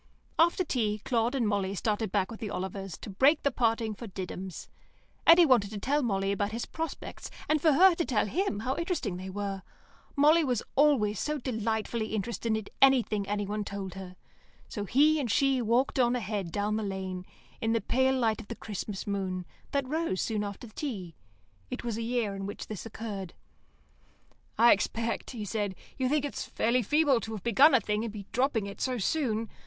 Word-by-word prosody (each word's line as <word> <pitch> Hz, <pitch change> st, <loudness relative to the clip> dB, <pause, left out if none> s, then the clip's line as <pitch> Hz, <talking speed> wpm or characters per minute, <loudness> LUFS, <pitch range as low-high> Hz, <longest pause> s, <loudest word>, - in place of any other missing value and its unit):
After 340 Hz, +3 st, +4 dB
tea 220 Hz, -9 st, -1 dB
Claude 240 Hz, +1 st, +1 dB
and 240 Hz, -5 st, +1 dB
Molly 200 Hz, -2 st, 0 dB
started 210 Hz, +1 st, -1 dB
back 200 Hz, +1 st, 0 dB
with 225 Hz, -, -8 dB
the 215 Hz, -, -4 dB
Olivers, 190 Hz, -1 st, -5 dB
to -, -, -7 dB
break 275 Hz, +10 st, +4 dB
the 280 Hz, -, +2 dB
parting 225 Hz, -3 st, +1 dB
for 230 Hz, +3 st, -8 dB
Diddums. 185 Hz, -1 st, -6 dB, 0.6 s
Eddy 335 Hz, +1 st, +9 dB
wanted 240 Hz, -8 st, +4 dB
to 215 Hz, -, -6 dB
tell 280 Hz, +8 st, +1 dB
Molly 195 Hz, -5 st, 0 dB
about 205 Hz, +1 st, -1 dB
his 235 Hz, -, -3 dB
prospects, 325 Hz, 0 st, -6 dB, 0.2 s
and 305 Hz, -1 st, +2 dB
for 315 Hz, -2 st, +5 dB
her 370 Hz, +6 st, +7 dB
to 335 Hz, -, -1 dB
tell 240 Hz, -9 st, +1 dB
him 225 Hz, -, -1 dB
how 255 Hz, +4 st, -1 dB
interesting 335 Hz, -, -2 dB
they 185 Hz, +1 st, -6 dB
were 195 Hz, 0 st, -4 dB, 0.5 s
(Molly 305 Hz, +4 st, +5 dB
was 250 Hz, -6 st, 0 dB
always 265 Hz, -8 st, +3 dB
so 300 Hz, 0 st, -1 dB
delightfully 225 Hz, -3 st, -2 dB
interested 220 Hz, +1 st, -1 dB
in 220 Hz, -, -5 dB, 0.2 s
anything 245 Hz, -7 st, +4 dB, 0.2 s
one 210 Hz, +1 st, -2 dB
told 195 Hz, -2 st, -5 dB
her), 185 Hz, -1 st, -9 dB, 0.5 s
so 205 Hz, -4 st, -4 dB
he 300 Hz, +8 st, +4 dB
and 260 Hz, -5 st, -2 dB
she 270 Hz, +3 st, +3 dB
walked 240 Hz, +4 st, +1 dB
on 245 Hz, 0 st, +3 dB
ahead 205 Hz, -6 st, -3 dB
down 210 Hz, +2 st, 0 dB
the -, -, -1 dB
lane, 190 Hz, -2 st, -4 dB, 0.4 s
in 225 Hz, 0 st, +1 dB
the 230 Hz, -, +2 dB
pale 260 Hz, +5 st, +2 dB
light 225 Hz, -3 st, +1 dB
of 215 Hz, -, -14 dB
the 235 Hz, -, -5 dB
Christmas 210 Hz, -2 st, -5 dB
moon, 190 Hz, -3 st, -2 dB, 0.2 s
that 280 Hz, -2 st, -1 dB
rose 310 Hz, -, -1 dB
soon 215 Hz, -2 st, -1 dB
after 205 Hz, +4 st, -6 dB
tea. 215 Hz, -, -5 dB, 0.6 s
(It -, -, -5 dB
was 235 Hz, -3 st, -2 dB
a 230 Hz, -, -3 dB
year 230 Hz, -3 st, -1 dB
when 195 Hz, +1 st, -5 dB
this 215 Hz, +1 st, -6 dB
occurred). 205 Hz, -5 st, -6 dB, 1.2 s
"I 235 Hz, +1 st, +7 dB
expect," 230 Hz, +3 st, 0 dB
he 225 Hz, -5 st, -5 dB
said, 205 Hz, -2 st, -2 dB, 0.2 s
"you 255 Hz, -1 st, 0 dB
think 295 Hz, 0 st, +1 dB
it's 285 Hz, -, -4 dB
fairly 245 Hz, +2 st, +1 dB
feeble 295 Hz, -1 st, +3 dB
to 225 Hz, 0 st, -6 dB
have 210 Hz, -, -6 dB
begun 265 Hz, +6 st, +6 dB
a -, -, +6 dB
thing 210 Hz, +1 st, -1 dB
and 230 Hz, -, -3 dB
be 205 Hz, -2 st, -8 dB
dropping 250 Hz, -4 st, +1 dB
it 200 Hz, -, -8 dB
so 255 Hz, -1 st, 0 dB
soon. 230 Hz, -1 st, 0 dB
225 Hz, 190 wpm, -29 LUFS, 200-260 Hz, 1.2 s, Eddy